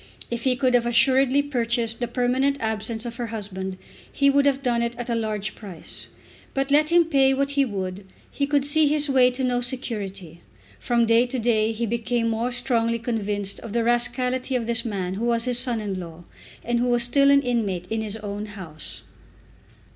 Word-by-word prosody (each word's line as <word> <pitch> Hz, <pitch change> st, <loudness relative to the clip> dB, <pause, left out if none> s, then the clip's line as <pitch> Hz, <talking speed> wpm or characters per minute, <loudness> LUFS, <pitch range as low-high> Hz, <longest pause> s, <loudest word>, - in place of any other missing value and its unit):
If 235 Hz, +1 st, -4 dB
he 255 Hz, -1 st, +3 dB
could 255 Hz, 0 st, +1 dB
have 240 Hz, -1 st, +3 dB
assuredly 265 Hz, +3 st, +3 dB
purchased 235 Hz, -4 st, -1 dB
the 240 Hz, -, -2 dB
permanent 255 Hz, +3 st, 0 dB
absence 220 Hz, +1 st, -3 dB
of 235 Hz, -1 st, -6 dB
her 240 Hz, -, -3 dB
husband, 190 Hz, -4 st, -5 dB, 0.3 s
he 280 Hz, 0 st, +3 dB
would 280 Hz, 0 st, +3 dB
have 275 Hz, 0 st, 0 dB
done 240 Hz, -2 st, +1 dB
it 235 Hz, 0 st, -2 dB
at 240 Hz, 0 st, -5 dB
a -, -, +1 dB
large 215 Hz, -2 st, -2 dB
price. 190 Hz, -7 st, -10 dB, 0.5 s
But 270 Hz, +1 st, -1 dB
let 300 Hz, +1 st, +4 dB
him 340 Hz, 0 st, +4 dB
pay 270 Hz, -4 st, +3 dB
what 275 Hz, +1 st, 0 dB
he 280 Hz, -1 st, +2 dB
would, 190 Hz, -3 st, -5 dB, 0.3 s
he 280 Hz, -, -1 dB
could 285 Hz, -1 st, +1 dB
see 300 Hz, +1 st, +4 dB
his 295 Hz, 0 st, +4 dB
way 255 Hz, -2 st, +5 dB
to 255 Hz, +1 st, -4 dB
no 245 Hz, -1 st, +1 dB
security. 200 Hz, -, -4 dB, 0.4 s
From 235 Hz, -, +1 dB
day 230 Hz, +2 st, +4 dB
to 260 Hz, +1 st, -4 dB
day 225 Hz, -2 st, +1 dB
he 230 Hz, +1 st, -2 dB
became 230 Hz, +1 st, -1 dB
more 230 Hz, +2 st, -1 dB
strongly 235 Hz, -2 st, 0 dB
convinced 205 Hz, -4 st, -2 dB
of 225 Hz, -, -9 dB
the 235 Hz, -1 st, +1 dB
rascality 250 Hz, +2 st, +1 dB
of 240 Hz, -2 st, -1 dB
this 230 Hz, 0 st, +1 dB
man 190 Hz, -5 st, -3 dB
who 215 Hz, +5 st, -3 dB
was 235 Hz, 0 st, +1 dB
his 245 Hz, -1 st, +3 dB
son 245 Hz, -2 st, +1 dB
in 200 Hz, -3 st, -4 dB
law, 170 Hz, -1 st, -9 dB, 0.4 s
and 240 Hz, 0 st, 0 dB
who 245 Hz, -, +1 dB
was 240 Hz, -1 st, +2 dB
still 275 Hz, +3 st, +4 dB
an 280 Hz, 0 st, +5 dB
inmate 210 Hz, -8 st, -1 dB
in 225 Hz, 0 st, -1 dB
his 215 Hz, 0 st, -4 dB
own 210 Hz, 0 st, -6 dB
house. 180 Hz, -7 st, -9 dB
235 Hz, 200 wpm, -24 LUFS, 215-260 Hz, 0.5 s, way